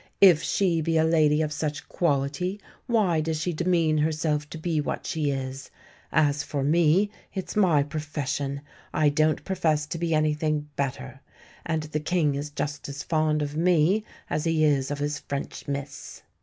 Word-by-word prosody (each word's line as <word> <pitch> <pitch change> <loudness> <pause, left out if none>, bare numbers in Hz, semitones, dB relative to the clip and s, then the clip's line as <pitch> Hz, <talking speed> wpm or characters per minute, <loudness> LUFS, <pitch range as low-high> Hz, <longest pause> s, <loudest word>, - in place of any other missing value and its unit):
If 180 -6 +7
she 175 -5 +1
be 165 +1 +1
a 160 - +4
lady 155 -1 +3
of 150 -1 -2
such 150 0 -3
quality, 165 +5 -1 0.3
why 200 -9 +2
does 160 0 -2
she 175 +3 -1
demean 165 -2 +2
herself 150 -1 0
to 160 - -7
be 160 -1 -1
what - - -4
she 155 -4 -1
is? 135 0 -4 0.4
As 145 -1 +2
for 140 -1 -3
me, 170 +6 +3 0.2
it's 190 - -4
my 175 -9 +4
profession; 145 -2 -3 0.3
I 155 -1 +4
don't 155 +2 +1
profess 160 -6 +1
to 160 +2 -5
be 165 -1 +1
anything 155 -1 0
better. 135 -1 -4 0.5
And 160 -2 0
the 155 0 -3
King 155 -2 +1
is 145 +2 -4
just 145 0 -4
as 140 0 -6
fond 155 -2 +1
of 145 0 -4
me 175 +4 +3 0.2
as 150 - -1
he 165 -1 +2
is 140 -3 +2
of 145 - -2
his 145 +1 -2
French 140 0 -6
miss." 140 0 -6
155 Hz, 170 wpm, -26 LUFS, 145-165 Hz, 0.5 s, If